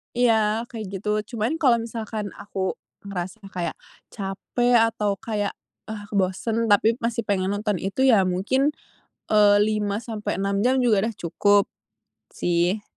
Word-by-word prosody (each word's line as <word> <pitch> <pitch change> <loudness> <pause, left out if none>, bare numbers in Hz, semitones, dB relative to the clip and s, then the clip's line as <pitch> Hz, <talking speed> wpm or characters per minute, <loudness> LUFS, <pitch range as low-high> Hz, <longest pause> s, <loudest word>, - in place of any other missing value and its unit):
Iya, 225 -2 +3
kayak 220 -2 -5
gitu. 205 +2 -4 0.3
Cuman, 230 +9 -1
kalo 260 -7 +5
misalkan 225 -3 -4
aku 190 -2 -2 0.3
ngerasanya 195 +1 -6
kayak 175 -4 -3 0.3
capek 210 +5 -1
atau 205 -3 -1
kayak, 210 -3 -2 0.4
ah, 205 -2 -7
bosen, 210 +4 0
tapi 220 +3 +4
masih 230 -1 -1
pengen 190 -1 +1
nonton 205 0 -1
itu, 195 +5 -4
ya 220 -7 +6
mungkin, 200 +11 +1 0.6
eee, 205 -1 +6
5-6 210 -1 -2
jam 250 +4 +3
juga 220 -2 +3
udah 230 - -5
cukup, 205 +3 +3 0.7
sih. 175 +4 +1
210 Hz, 130 wpm, -24 LUFS, 195-225 Hz, 0.7 s, ya